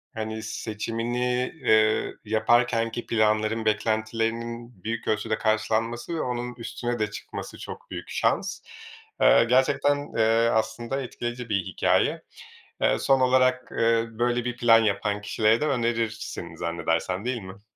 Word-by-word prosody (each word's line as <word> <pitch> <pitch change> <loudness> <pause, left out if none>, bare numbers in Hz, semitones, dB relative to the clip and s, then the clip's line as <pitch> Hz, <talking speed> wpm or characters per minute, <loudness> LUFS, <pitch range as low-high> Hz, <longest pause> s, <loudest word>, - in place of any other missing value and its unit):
hani, 110 0 -4
seçimini, 120 +3 -2
eee, 110 0 +3
yaparkenki 115 +1 +1
planların 110 0 +1
beklentilerinin 115 +1 -2
büyük 115 +1 -4
ölçüde 110 0 0
karşılanması 115 +6 0
ve 160 - -1
onun 125 -1 -3
üstüne 120 0 -4
de 105 -1 -1
çıkması - - -7
çok 475 +2 -9
büyük - - -6
şans. - - 0 0.6
Eee, - - +7
gerçekten, 145 +1 +2
eee, 115 +1 +3
aslında 115 +4 -1
etkileyici 120 -1 -5
bir 100 -3 0
hikâye. - - +1 0.6
Eee, - - +3
son 135 -1 +3
olarak, 130 0 +3
eee, 115 0 +3
böyle 120 +1 -1
bir 125 0 -3
plan 115 -2 +6
yapan 105 0 0
kişilere 110 +3 +2
de 150 - +1
önerirsin 115 -4 -2
zannedersem, 85 +4 -2
değil 125 -3 -2
mi? 95 +2 -11
115 Hz, 130 wpm, -26 LUFS, 110-120 Hz, 0.6 s, Eee